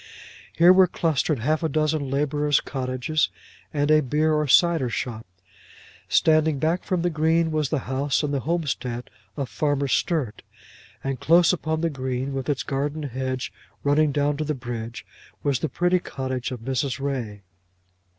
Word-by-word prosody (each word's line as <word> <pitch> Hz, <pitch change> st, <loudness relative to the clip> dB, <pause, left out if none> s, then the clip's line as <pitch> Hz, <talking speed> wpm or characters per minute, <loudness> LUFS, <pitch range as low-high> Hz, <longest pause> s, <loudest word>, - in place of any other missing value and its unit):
Here 175 Hz, +2 st, +8 dB
were 185 Hz, 0 st, +6 dB
clustered 160 Hz, -3 st, 0 dB
half 150 Hz, +8 st, 0 dB
a 160 Hz, -, 0 dB
dozen 155 Hz, -1 st, 0 dB
labourers' 145 Hz, +1 st, +1 dB
cottages, 130 Hz, +3 st, -1 dB, 0.4 s
and 145 Hz, 0 st, +1 dB
a 155 Hz, 0 st, +6 dB
beer 150 Hz, +3 st, +1 dB
or 150 Hz, -1 st, +1 dB
cider 165 Hz, -2 st, +4 dB
shop. 115 Hz, -1 st, -4 dB, 0.8 s
Standing 155 Hz, -2 st, +3 dB
back 160 Hz, +6 st, 0 dB
from 180 Hz, -2 st, -1 dB
the 175 Hz, -, +1 dB
green 160 Hz, +1 st, +2 dB
was 155 Hz, -3 st, 0 dB
the 155 Hz, -, 0 dB
house 140 Hz, +3 st, 0 dB
and 145 Hz, -1 st, -1 dB
homestead 135 Hz, -5 st, -2 dB, 0.3 s
of 140 Hz, -, -2 dB
Farmer 140 Hz, +4 st, 0 dB
Sturt, 135 Hz, -, 0 dB, 0.6 s
and 135 Hz, -2 st, -2 dB
close 170 Hz, +6 st, +5 dB
upon 160 Hz, -2 st, -2 dB
the 165 Hz, -1 st, 0 dB
green, 130 Hz, 0 st, -3 dB
with 135 Hz, +1 st, -3 dB
its 140 Hz, -3 st, 0 dB
garden 145 Hz, +3 st, -2 dB
hedge 130 Hz, -1 st, -3 dB, 0.3 s
running 145 Hz, +1 st, +3 dB
down 145 Hz, +1 st, 0 dB
to 155 Hz, -, -1 dB
the 150 Hz, 0 st, -2 dB
bridge, 120 Hz, -2 st, -6 dB, 0.4 s
was 140 Hz, -4 st, +1 dB
the 160 Hz, -, -2 dB
pretty 180 Hz, +1 st, +2 dB
cottage 130 Hz, -6 st, -4 dB
of 125 Hz, -3 st, -6 dB
Mrs. 135 Hz, +2 st, -2 dB
Ray. 120 Hz, -8 st, -4 dB
145 Hz, 160 wpm, -24 LUFS, 130-155 Hz, 0.8 s, Here